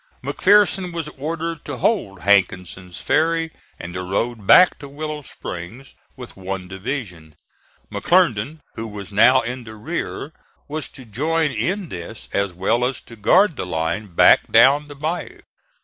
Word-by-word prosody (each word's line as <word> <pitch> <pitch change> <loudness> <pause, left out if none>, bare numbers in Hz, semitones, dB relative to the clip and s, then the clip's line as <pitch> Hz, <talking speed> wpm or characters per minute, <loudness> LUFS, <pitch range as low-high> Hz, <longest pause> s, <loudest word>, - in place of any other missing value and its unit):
McPherson 195 -2 +3
was 165 -3 -4
ordered 160 +2 -4
to 145 -3 -5
hold 110 - 0
Hankinson's 90 -2 +1
ferry 165 0 +1 0.3
and 85 0 -8
the 90 - -4
road 100 +3 -2
back 180 0 +7
to 140 - -9
Willow 150 +1 -5
Springs 110 +1 -8 0.2
with 125 -2 -11
one 95 -1 -5
division; 95 - -6 0.6
McClernand, 155 - +1
who 115 - -5
was 105 -2 -8
now 125 +6 +5
in 125 +1 -5
the 110 -1 -10
rear, 150 +4 -5 0.3
was 155 +1 -4
to 130 - -13
join 150 +8 0
in 190 -2 -2
this 90 +5 -8
as 100 -1 0
well 100 +7 0
as 130 +1 -1
to 115 - -13
guard 170 - +3
the - - -3
line 90 +6 -2
back - - +5
down 135 +6 +5
the 145 - -10
bayou. 155 +5 -4
125 Hz, 150 wpm, -21 LUFS, 100-155 Hz, 0.6 s, back